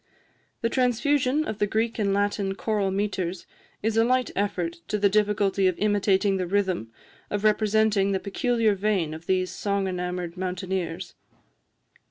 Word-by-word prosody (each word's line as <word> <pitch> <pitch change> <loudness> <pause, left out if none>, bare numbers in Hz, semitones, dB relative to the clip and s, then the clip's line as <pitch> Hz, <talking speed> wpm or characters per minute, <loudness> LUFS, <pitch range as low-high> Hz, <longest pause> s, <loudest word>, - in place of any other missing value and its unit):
The 230 - +1
transfusion 260 +4 +1
of 220 -5 -4
the 205 - +2
Greek 225 +2 -1
and 200 -2 +1
Latin 200 -1 0
choral 210 -2 0
metres 190 -3 -2 0.4
is 220 +1 0
a 225 - +5
light 255 +1 +1
effort 185 -4 -1
to 210 - -1
the 200 -1 +3
difficulty 200 -2 +2
of 185 - 0
imitating 200 -1 +2
the 185 -1 -2
rhythm, 185 - 0 0.4
or 205 - 0
representing 215 -1 +2
the 190 - 0
peculiar 225 +2 +1
vein 195 -5 0
of 160 +2 -10
these 185 -1 +1
song 200 -1 -1
enamoured 180 -1 -3
mountaineers. 185 -1 -3
200 Hz, 150 wpm, -26 LUFS, 185-215 Hz, 0.4 s, a